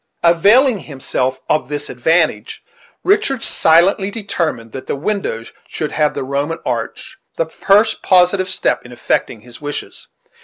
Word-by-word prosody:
Availing 205 +8 +4
himself 130 -3 -3
of 150 -4 0
this 145 0 -3
advantage, 130 -4 0 0.4
Richard 385 - +1
silently 185 +5 +3
determined 170 - -3
that 130 - -8
the - - -2
windows 140 - -3
should 155 - -4
have 150 -1 0
the - - -3
Roman 140 +5 -2
arch; - - -4 0.2
the - - +1
first 210 - +2
positive 185 +1 +3
step 185 - 0
in 120 - -13
effecting 120 -2 -2
his 120 +3 -13
wishes. 145 0 -6
160 Hz, 140 wpm, -17 LUFS, 130-200 Hz, 0.4 s, Availing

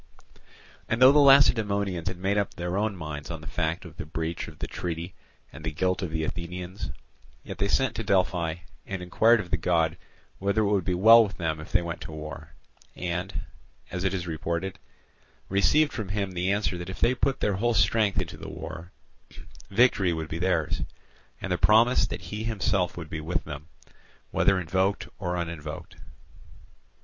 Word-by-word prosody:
And 110 - 0
though 130 +1 +9
the 150 - +5
Lacedaemonians 105 - +4
had 95 -2 -2
made 95 +3 0
up 100 -2 -1
their 90 -1 -3
own 105 0 0
minds 75 -3 -6
on 80 -2 -5
the - - -11
fact 80 +1 -2
of 85 -2 -12
the - - -5
breach 80 +1 -3
of - - -11
the - - -4
treaty 85 +1 -5 0.4
and 80 - -10
the 80 - -2
guilt 90 +4 0
of 90 - -2
the 80 0 -2
Athenians, 90 +2 -5 0.5
yet - - -8
they 100 - +2
sent 130 +4 +2
to 115 - -2
Delphi 90 -4 +1 0.3
and 95 -2 -4
inquired 110 +6 +4
of 95 -4 -6
the 90 - +3
God 80 -1 +1 0.4
whether 100 +2 +1
it 105 -1 +1
would 100 -4 +1
be 90 - +1
well 115 +5 +8
with 100 -3 -5
them 80 -3 -2
if 75 - -10
they 85 - +3
went 85 -1 -5
to - - -7
war; 75 -1 -8 0.4
and, 90 +2 -3 0.5
as 90 0 -3
it 95 - +2
is 95 -2 -3
reported, 85 +3 -3 0.7
received 145 +10 +3
from 105 -4 -4
him 100 -1 -2
the 90 +1 0
answer 100 -3 0
that 90 +1 -6
if 95 - -7
they 120 - +3
put 135 +1 0
their 100 -2 +1
whole 120 +3 +1
strength 100 0 +3
into - - -4
the - - -8
war, 85 +3 -8 0.8
victory 100 -4 +3
would 80 -1 -4
be 80 - -4
theirs, 85 -3 0 0.6
and 95 - -5
the 90 - +1
promise 110 +2 +5
that 105 - -5
he 105 +1 -3
himself 100 -5 0
would 85 -3 -6
be 80 - -3
with 80 +3 -2
them, 75 0 -8 0.6
whether 95 - +3
invoked 95 +3 0
or 90 -3 -2
uninvoked. 80 0 -6
90 Hz, 190 wpm, -27 LUFS, 85-100 Hz, 0.8 s, though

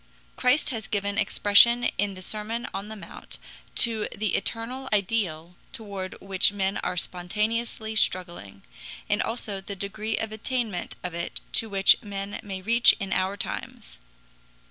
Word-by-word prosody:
Christ 260 +4 +3
has 225 -4 -4
given 200 0 -1
expression 215 +4 +5 0.2
in 200 -1 0
the 185 - -9
Sermon 215 +4 -3
on 195 +2 -4
the 220 - -7
Mount 205 - -10 0.4
to 225 -3 +3
the 215 -1 -1
eternal 245 +6 -3
ideal 185 -5 -1 0.2
toward 200 -6 -4
which 195 0 +5
men 195 -1 0
are 180 - -3
spontaneously 220 +5 -2
struggling, 175 - -1 0.4
and - - +1
also 215 -4 -3
the 200 +1 -7
degree 210 +3 -3
of 220 -1 -2
attainment 220 -3 -3
of 180 -2 -4
it 170 0 -3
to 225 - +1
which 195 -1 +5
men 200 -2 -4
may 190 -2 -6
reach 235 +3 +6
in 195 -2 -2
our 190 +2 0
times. - - -6
205 Hz, 145 wpm, -26 LUFS, 190-225 Hz, 0.4 s, reach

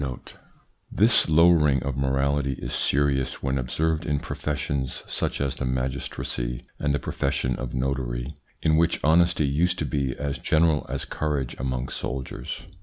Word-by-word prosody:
1 65 -2 -4 0.7
This 110 -3 +4
lowering 80 -4 +5
of 70 -1 -2
morality 70 +1 +1
is - - -6
serious 65 -2 +1
when 70 0 0
observed 80 +6 0
in 75 -4 0
professions 70 -3 -3
such - - -2
as 70 -2 -1
the 70 - -2
magistracy 65 -1 -3
and 70 - +1
the 70 - +2
profession 65 -3 -1
of 65 -1 -5
notary, 65 0 -2 0.3
in 80 -1 +4
which 85 +1 +2
honesty 85 0 +4
used 85 +6 +1
to 75 - -1
be 70 -1 -1
as 70 -2 -3
general 80 +2 +2
as 70 +1 -3
courage 75 -5 -2
among 65 0 -2
soldiers. 65 0 -5
70 Hz, 150 wpm, -25 LUFS, 65-75 Hz, 0.7 s, lowering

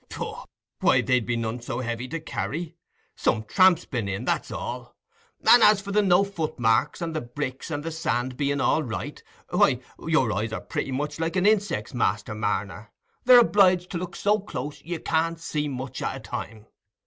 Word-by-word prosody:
"Pooh! - - -6 0.3
why, - - +4
they'd 125 -3 +1
be 120 - 0
none 115 +1 -3
so 120 +1 -4
heavy 120 0 -3
to 165 +5 -4
carry. 160 +1 -4 0.4
Some 110 - 0
tramp's 180 - +4
been 115 -7 -3
in, 95 0 -3
that's - - -1
all; - - -6 0.5
and 240 - +8
as 210 -2 +6
for 200 0 -7
the 210 +1 +3
no 190 -1 +4
footmarks, 155 - 0
and 165 -1 -4
the 155 - -1
bricks 130 +3 -5
and 145 -2 -3
the 165 - -4
sand 125 -5 -2
being 140 +1 0
all 160 - +2
right—why, 120 -7 -1 0.3
your - - +2
eyes 110 +4 -2
are - - -4
pretty 135 - -4
much 145 +3 -3
like 165 +1 -1
a 185 - +2
insect's, 210 -1 +1
Master - - 0
Marner; - - -3 0.3
they're 250 0 +9
obliged 185 -5 +3
to 175 - -2
look 180 0 -6
so 210 +1 +2
close, 145 -7 -6
you 170 0 -5
can't 165 +1 0
see 150 -2 -2
much 130 -1 -5
at - - -2
a - - -7
time. 110 -1 -7
150 Hz, 185 wpm, -25 LUFS, 125-180 Hz, 0.5 s, they're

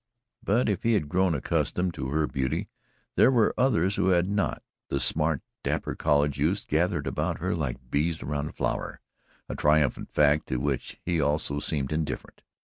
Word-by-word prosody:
But 115 +3 +2
if 100 -3 0
he 115 - +2
had 75 -8 0
grown 90 0 +2
accustomed 90 +6 0
to 65 -4 -4
her 75 +2 +1
beauty, 65 -1 -2 0.5
there - - +6
were 120 -5 +3
others 100 -7 +2
who 95 -1 +2
had 90 -1 +3
not, 100 0 -1 0.3
and 70 - 0
smart, 75 +1 +1 0.2
dapper - - -2
college 75 -1 +1
youths - - +1
gathered - - 0
about - - -1
her 90 +3 -1
like 65 -6 -4
bees 80 +3 0
around 75 0 -2
a - - -9
flower - - -3 0.5
a - - -5
triumphant 75 -2 +2
fact 75 +1 +3
to 65 - -1
which 70 0 -3
he 85 -2 +1
also 75 0 0
seemed 70 -2 0
indifferent. 75 -1 -4
75 Hz, 175 wpm, -27 LUFS, 70-90 Hz, 0.5 s, there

